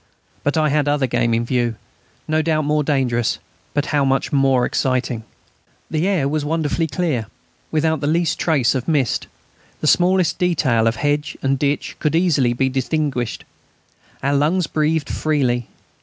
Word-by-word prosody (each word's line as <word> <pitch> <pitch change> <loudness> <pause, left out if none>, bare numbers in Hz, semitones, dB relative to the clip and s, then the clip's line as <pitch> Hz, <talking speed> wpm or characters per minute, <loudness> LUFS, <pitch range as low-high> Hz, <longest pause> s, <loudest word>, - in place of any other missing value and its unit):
But 145 +3 0
I 155 -1 +3
had 145 0 +1
other 145 -2 +2
game 120 -1 0
in 115 +1 0
view 120 -2 0 0.5
no 155 0 +2
doubt 155 -1 0
more 150 0 +1
dangerous, 120 - 0 0.4
but 145 0 +1
how 145 -1 +3
much 135 +1 0
more 135 -3 +3
exciting! 125 -3 -1 0.7
The 160 +3 0
air 180 -9 +1
was 150 +1 -1
wonderfully 160 +1 0
clear, 140 -7 -1 0.4
without 160 0 +1
the 145 - -1
least 165 +1 +1
trace 145 -8 +2
of 130 -2 -3
mist. 145 -7 0 0.5
The - - -4
smallest 175 0 +3
detail 135 -11 +2
of 115 - +1
hedge 145 +2 -1
and 135 0 +1
ditch 145 0 -1
could 150 - 0
be 165 - +3
easily 135 -9 +2
distinguished. 130 -1 -1 0.8
Our 140 +1 +1
lungs 160 +6 +2
breathed 155 -1 0
freely. 130 -6 0
145 Hz, 155 wpm, -20 LUFS, 130-155 Hz, 0.8 s, I